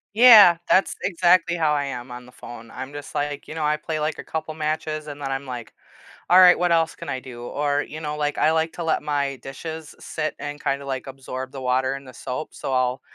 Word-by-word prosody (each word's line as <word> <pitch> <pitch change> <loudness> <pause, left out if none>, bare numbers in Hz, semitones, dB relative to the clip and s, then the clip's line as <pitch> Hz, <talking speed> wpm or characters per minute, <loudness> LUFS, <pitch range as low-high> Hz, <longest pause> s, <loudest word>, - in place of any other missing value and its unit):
Yeah, 215 -8 +9
that's 190 - +3
exactly 175 -1 +3
how 155 -3 +2
I 145 -1 0
am 125 -2 -6
on 125 0 -9
the 125 - -16
phone, 115 -2 -11
I'm 130 +2 -7
just 145 -1 -8
like, 145 0 -3
you - - -7
know, 160 -1 -3
I 150 0 +2
play, 155 0 -4
like, 155 +1 -1
a - - -7
couple 160 -1 -5
matches 155 0 -2
and 145 0 -8
then 135 - -3
I'm 135 +1 -3
like, 120 -3 -7 0.6
"All 180 - +8
right, 180 -1 +8
what 175 -1 +1
else 165 -1 +2
can - - -8
I 130 - -2
do?" 120 -2 -10
Or 145 +2 -1
you 155 - -8
know, 150 -1 -4
like, 150 0 -2
I 155 - +3
like 160 0 +1
to 170 - -5
let 160 - 0
my 140 -2 -1
dishes 155 +5 -8
sit 155 -1 -3
and 145 +1 -6
kinda, 140 0 -1
like, 135 0 -4
absorb 130 0 -7
the 135 - -8
water 130 +1 +1
and 135 -1 -10
the 130 - -11
soap, 130 +4 -6
so 135 - -5
I'll 130 0 0
145 Hz, 240 wpm, -23 LUFS, 130-160 Hz, 0.6 s, Yeah